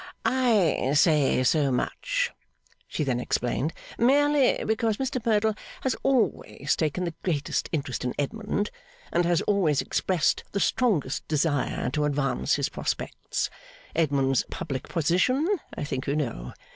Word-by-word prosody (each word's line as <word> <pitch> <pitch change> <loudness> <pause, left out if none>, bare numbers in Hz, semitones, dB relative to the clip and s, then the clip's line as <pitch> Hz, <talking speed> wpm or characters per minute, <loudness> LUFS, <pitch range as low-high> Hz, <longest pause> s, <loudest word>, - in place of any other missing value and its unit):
'I 215 - +2
say 145 -4 +4
so 140 +2 +3
much,' - - -1 0.6
she 155 - -2
then 130 -4 0
explained, 125 +5 -1 0.3
'merely 285 +2 +4
because 220 -1 +1
Mr 260 -3 -2
Merdle 220 -1 +2 0.3
has 265 - 0
always 215 - +1
taken 160 +3 -1
the 170 -2 -2
greatest 150 -6 -1
interest 140 -6 -2
in 125 - -2
Edmund, 205 +7 -2 0.4
and 175 0 +3
has 170 -1 +2
always 180 -9 +2
expressed 180 -6 +1
the 200 - 0
strongest 185 - +1
desire 145 -4 0
to 150 +2 0
advance 145 -1 +1
his - - 0
prospects. - - -3 0.4
Edmund's 135 -4 +2
public 130 -2 -5
position, 185 - +2 0.3
I - - -2
think 130 -2 -4
you 140 - +1
know. 115 - -3
165 Hz, 130 wpm, -26 LUFS, 140-220 Hz, 0.6 s, say